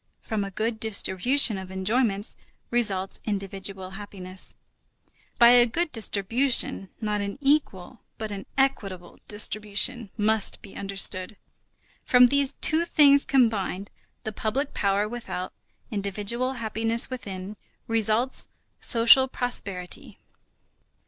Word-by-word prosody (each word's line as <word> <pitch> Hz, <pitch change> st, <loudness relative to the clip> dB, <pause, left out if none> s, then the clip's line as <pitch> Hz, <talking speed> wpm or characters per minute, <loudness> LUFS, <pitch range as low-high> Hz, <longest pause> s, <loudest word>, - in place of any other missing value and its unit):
From 215 Hz, -2 st, -2 dB
a 200 Hz, -, -5 dB
good 220 Hz, +3 st, -3 dB
distribution 220 Hz, +2 st, +2 dB
of 190 Hz, -1 st, -9 dB
enjoyments 205 Hz, +2 st, -1 dB, 0.4 s
results 200 Hz, -6 st, 0 dB
individual 195 Hz, -2 st, -4 dB
happiness. 190 Hz, -2 st, -6 dB, 0.8 s
By 235 Hz, -, +7 dB
a 245 Hz, 0 st, +6 dB
good 330 Hz, +7 st, -2 dB
distribution, 225 Hz, -1 st, +1 dB
not 210 Hz, -2 st, -2 dB
an 200 Hz, 0 st, -5 dB
equal 275 Hz, -7 st, -1 dB, 0.2 s
but 220 Hz, -2 st, -5 dB
an 195 Hz, -1 st, -7 dB
equitable 195 Hz, -10 st, -2 dB
distribution 210 Hz, +1 st, +1 dB
must 215 Hz, 0 st, 0 dB
be 200 Hz, -, -13 dB
understood. 195 Hz, 0 st, -1 dB, 0.7 s
From 250 Hz, -1 st, +5 dB
these 280 Hz, 0 st, +3 dB
two 320 Hz, +2 st, +2 dB
things 285 Hz, -4 st, +5 dB
combined, 210 Hz, -7 st, 0 dB, 0.3 s
the 220 Hz, -, -4 dB
public 225 Hz, +7 st, -3 dB
power 200 Hz, +1 st, 0 dB
without, 225 Hz, -5 st, -6 dB, 0.4 s
individual 210 Hz, +5 st, -1 dB
happiness 225 Hz, 0 st, 0 dB
within, 200 Hz, -5 st, -7 dB, 0.3 s
results 225 Hz, +3 st, +1 dB, 0.3 s
social 235 Hz, +3 st, +6 dB
prosperity. 200 Hz, -8 st, -5 dB
215 Hz, 110 wpm, -25 LUFS, 195-245 Hz, 0.8 s, By